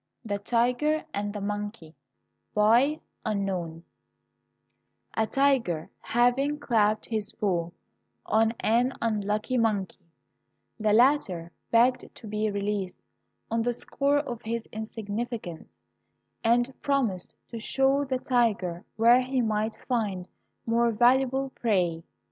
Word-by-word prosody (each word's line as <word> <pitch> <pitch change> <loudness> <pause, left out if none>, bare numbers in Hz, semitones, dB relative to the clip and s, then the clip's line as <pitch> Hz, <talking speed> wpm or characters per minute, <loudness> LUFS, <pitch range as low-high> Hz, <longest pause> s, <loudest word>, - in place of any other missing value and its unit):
THE 205 -2 -2
TIGER 250 +8 +1
AND 205 +1 -2
THE 205 -1 -6
MONKEY 205 -5 -5 0.6
A 235 +8 +4 2.3
TIGER 255 - +1
having 250 +5 +1
clapped 215 -6 +1
his 215 -2 -2
paw 175 -6 -1 0.6
on 220 +1 +3
an 240 +4 +2
unlucky 215 +2 0
mon 215 -4 +2
key, 190 - -23 0.8
the 215 -1 +2
latter 210 - +3 0.2
begged 245 +2 +2
to - - -12
be 215 +1 -1
released 200 -2 -3 0.5
on 230 0 +1
the 240 +1 0
score 280 +4 0
of 245 -5 -3
his 230 +1 -3
insignificance, 215 - -6 0.6
and 240 +3 +2
promised 240 -11 -1
to 230 - -6
show 270 +4 +2
the 265 -2 -1
tiger 215 -9 0
where 235 +3 +6
he 260 +1 -1
might 220 -1 0
find 205 -7 -1 0.4
more 235 +1 +2
valuable 260 +3 +3
prey. 180 -10 0
225 Hz, 110 wpm, -27 LUFS, 205-250 Hz, 2.3 s, where